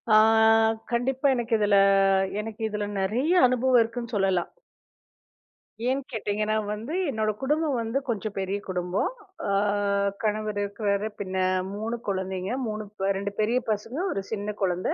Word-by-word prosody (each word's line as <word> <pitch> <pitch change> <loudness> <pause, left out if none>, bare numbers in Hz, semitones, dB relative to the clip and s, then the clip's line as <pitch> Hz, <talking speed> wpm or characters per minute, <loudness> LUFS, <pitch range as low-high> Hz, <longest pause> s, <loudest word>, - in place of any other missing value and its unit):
ஆ. - - +9 0.7
கண்டிப்பா, 260 +3 +1
எனக்கு 240 -1 -2
இதுல 205 -1 +4 0.6
எனக்கு 220 +1 -8
இதுல 210 -1 -2
நெறைய 245 - +1
அனுபவம் 250 0 +4
இருக்குன்னு 235 +1 -6
சொல்லலாம். 190 -3 +1 1.4
ஏன்! 265 +2 +1
கேட்டீங்கன்னா 215 -1 -1 0.2
வந்து, 225 +8 -6 0.2
என்னோட 220 -4 0
குடும்பம் 300 +1 +1
வந்து, 225 +3 -2
கொஞ்சம் 215 -3 -3
பெரிய 195 +1 -1
குடும்பம். 180 +1 -1 0.4
ஆ. - - -1 0.7
கணவர் 215 -1 -1
இருக்றாரு. 200 0 -1
பின்ன 190 -2 -4 0.4
3 220 +3 -3
குழந்தைங்க. 190 0 -2 0.2
3, 215 0 -3 0.3
2 200 +1 -3
பெரிய 220 +3 +2
பசங்க! 220 +7 -3
1 195 - -2
சின்னக் 210 -1 -4
குழந்தை! 180 -1 0
215 Hz, 130 wpm, -26 LUFS, 200-235 Hz, 1.4 s, ஆ